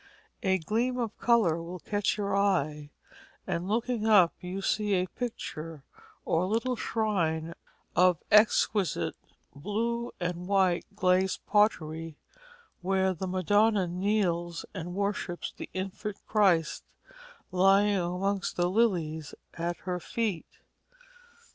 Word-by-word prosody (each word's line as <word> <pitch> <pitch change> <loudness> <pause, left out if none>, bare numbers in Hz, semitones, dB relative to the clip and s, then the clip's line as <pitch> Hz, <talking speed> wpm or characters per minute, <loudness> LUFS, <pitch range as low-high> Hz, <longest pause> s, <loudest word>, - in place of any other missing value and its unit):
A 190 -4 +2
gleam 230 +9 -1
of 230 -3 -2
colour 210 -9 +3
will 175 +2 -7
catch 205 +3 -1
your 200 -1 -1
eye, 155 -7 +1 0.6
and 175 +2 -2
looking 225 +1 0
up 195 -6 +6
you 180 +2 -5
see 205 +1 +1
a 180 0 +1
picture 165 - -6 0.4
or 170 +3 +1
little 230 +5 0
shrine 170 -9 -1 0.4
of 180 -1 +5
exquisite 210 -3 +3 0.4
blue 230 +9 -2
and 175 0 -3
white 190 -3 +2
glazed 185 -1 +1
pottery, 165 -7 +1 0.6
where 190 +1 +1
the 185 +2 -5
Madonna 205 +2 +2
kneels 175 -2 -1
and 175 -1 -6
worships 200 -3 -2
the - - -8
Infant 195 +2 -5
Christ 185 -7 +2 0.7
lying 195 +2 +4
amongst 185 +2 -1
the 175 0 +1
lilies 170 -8 0 0.2
at 170 +1 -3
her 180 -1 -3
feet. 205 -1 -2
190 Hz, 115 wpm, -29 LUFS, 175-210 Hz, 0.7 s, up